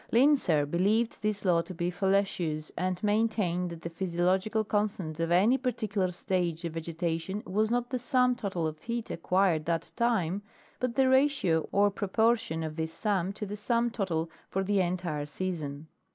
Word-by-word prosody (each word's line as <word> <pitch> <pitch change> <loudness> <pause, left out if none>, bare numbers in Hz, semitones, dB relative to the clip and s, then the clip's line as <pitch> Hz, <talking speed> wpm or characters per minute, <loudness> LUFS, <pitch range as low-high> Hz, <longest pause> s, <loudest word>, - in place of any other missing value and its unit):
Linsser 235 - +4
beheved 205 +9 +1
this 210 -1 -2
law 170 -2 +4
to 185 +2 -9
be 175 +1 -1
fallacious 180 -5 0
and 185 +2 -2
main 215 +2 +3
tained 180 -5 -1
that 170 -1 -8
the 170 - -3
physiological 185 +5 0
constant 200 -7 -2
of 165 0 0
any 205 +10 +4
particular 215 -7 -1
stage 175 -2 -2
of 165 - -3
vegetation 165 +4 -3
was 215 +4 +1
not 245 +1 -1
the 255 - -1
sum 250 -1 +2
total 190 -8 -2
of 155 -1 -3
heat 235 +2 -4
acquired 175 -2 +1
that 165 -1 -1
time, 205 -6 +1 0.4
but 250 -2 -1
the 265 -1 +4
ratio 260 - +3
or 205 0 +4
proportion 205 -4 +1
of 155 0 -5
this 160 0 -2
sum 195 0 0
to 210 +1 -5
the 205 +1 -5
sum 235 +3 +1
total 175 -8 -1 0.2
for 195 - -1
the 200 0 +2
entire 175 -5 -2
season. 150 -3 -4
190 Hz, 170 wpm, -29 LUFS, 170-220 Hz, 0.4 s, Linsser